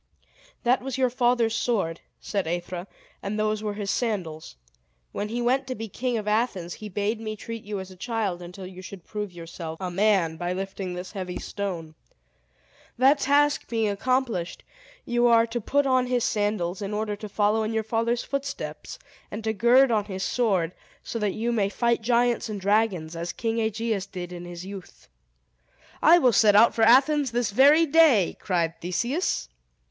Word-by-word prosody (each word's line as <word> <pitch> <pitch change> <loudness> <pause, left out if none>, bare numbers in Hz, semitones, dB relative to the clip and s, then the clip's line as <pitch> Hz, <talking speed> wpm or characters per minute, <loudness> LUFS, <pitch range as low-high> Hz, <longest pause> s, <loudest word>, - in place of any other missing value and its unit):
"That 250 +2 +3
was 265 0 -4
your 255 -2 +2
father's 240 -2 +2
sword," 200 -9 -1 0.2
said 195 -5 -2
Aethra, 175 +2 -4 0.3
"and 200 +2 -3
those 215 0 0
were 210 -1 -3
his 200 -1 -2
sandals. 175 - -3 0.6
When 210 - -4
he 240 +2 -2
went 260 +2 +1
to 255 - -3
be 225 +1 -6
king 245 +4 -2
of 210 -1 -5
Athens, 210 -6 0
he 215 - -8
bade 205 +3 -2
me 215 -1 -4
treat 230 +1 -7
you 205 -1 -4
as 190 0 -8
a - - -12
child 200 -3 -2
until 180 +2 -9
you 185 0 -10
should 185 -1 -10
prove 210 -2 -5
yourself 165 -1 -8
a 185 -2 -4
man 190 -4 +2
by 175 +2 -2
lifting 190 -1 -5
this 180 +1 -7
heavy 185 -3 -5
stone. 175 -6 -5 1.0
That 270 +4 +5
task 290 +1 +2
being 225 -2 +1
accomplished, 230 -4 -1 0.4
you 240 0 +2
are 230 -1 +5
to 235 +1 -4
put 285 +6 +1
on 255 -1 +2
his 245 -2 +1
sandals, 205 -3 -1
in 205 +1 -3
order 210 -1 -2
to 215 0 -8
follow 210 +2 +2
in 215 0 -1
your 220 0 0
father's 230 +2 0
footsteps, 275 0 -5 0.3
and 215 +2 -6
to 220 0 0
gird 240 +5 +5
on 210 -3 +1
his 190 -2 -5
sword, 190 -9 +1 0.3
so 230 - -4
that 210 -2 -1
you 230 +2 -1
may 205 -4 +1
fight 235 +2 +1
giants 240 0 +1
and 210 -2 -4
dragons, 195 -5 +1
as 170 +1 -4
King 230 -1 -2
Aegeus 220 -2 -1
did 180 -2 -7
in 175 0 -7
his 175 0 -8
youth." 195 - -11 0.9
"I 335 +3 +7
will 255 -8 +4
set 210 0 +5
out 230 +3 +6
for 230 - -2
Athens 270 +5 +5
this 240 -2 -1
very 285 +8 +6
day!" 295 - +4
cried 170 -4 -1
Theseus. 235 - -1
215 Hz, 185 wpm, -25 LUFS, 185-240 Hz, 1.0 s, I